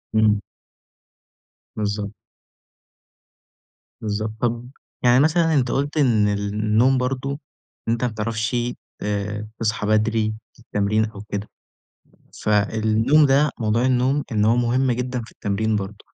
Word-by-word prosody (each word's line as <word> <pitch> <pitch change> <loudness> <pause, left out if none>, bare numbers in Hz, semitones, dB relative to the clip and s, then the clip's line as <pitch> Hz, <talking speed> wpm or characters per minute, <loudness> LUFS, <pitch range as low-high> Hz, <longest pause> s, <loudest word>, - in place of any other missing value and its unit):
امم. 110 -1 +4 1.4
بالضبط. 105 -1 -2 1.9
بالضبط، 110 0 -2
طب 120 0 -1 0.3
يعني 125 0 +6
مثلًا 160 +2 +3
أنت 130 -5 +2
قُلت 145 +3 -1
إن 115 -7 +3
النوم 105 +5 +2
برضه، 135 +2 -2 0.5
أنت 115 +1 0
ما 125 - +2
بتعرفشِ 110 +2 -2 0.5
آآ 105 +1 -3
تصحى 110 -1 -1
بدري 110 0 +2 0.2
في - - -25
التمرين 110 -1 0
أو 105 -2 -9
كده، 105 0 -5 0.9
ف - - -3
النوم 110 +7 +3
ده 140 +2 +4
موضوع 110 +3 +1
النوم، 130 +3 +2
إن 105 -1 +2
هو 115 +2 +4
مُهم 125 +2 +2
جدًا 125 0 -2
في - - -15
التمرين 110 +2 -1
برضه، 100 0 -6
110 Hz, 120 wpm, -22 LUFS, 105-125 Hz, 1.9 s, يعني